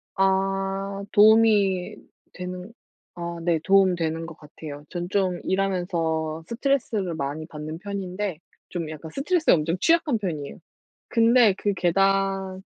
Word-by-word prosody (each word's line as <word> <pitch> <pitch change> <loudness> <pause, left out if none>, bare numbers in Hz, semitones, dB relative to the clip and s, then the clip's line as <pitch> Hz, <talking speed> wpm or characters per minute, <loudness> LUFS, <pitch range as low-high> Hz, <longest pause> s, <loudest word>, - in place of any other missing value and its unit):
아 195 +1 0
도움이 210 -3 +4 0.4
되는 180 +3 -7 0.4
아 170 0 -5
네. 170 -1 +2
도움이 190 -1 +4
되는 165 0 -2
것 165 - -10
같아요. 150 -1 -10
전 175 -1 -4
좀 185 -2 0
일하면서 170 -5 -1
스트레스를 230 -7 -1
많이 155 +1 -4
받는 155 0 -7
편인데 195 -2 -4 0.3
좀 170 -3 -4
약간 155 +1 -8
스트레스에 315 - +2
엄청 165 +2 0
취약한 330 -8 +3
편이에요. 155 -8 -5 0.5
근데 230 -3 +5
그 205 - 0
계단 195 +1 +1
185 Hz, 270 characters per minute, -24 LUFS, 165-200 Hz, 0.5 s, 근데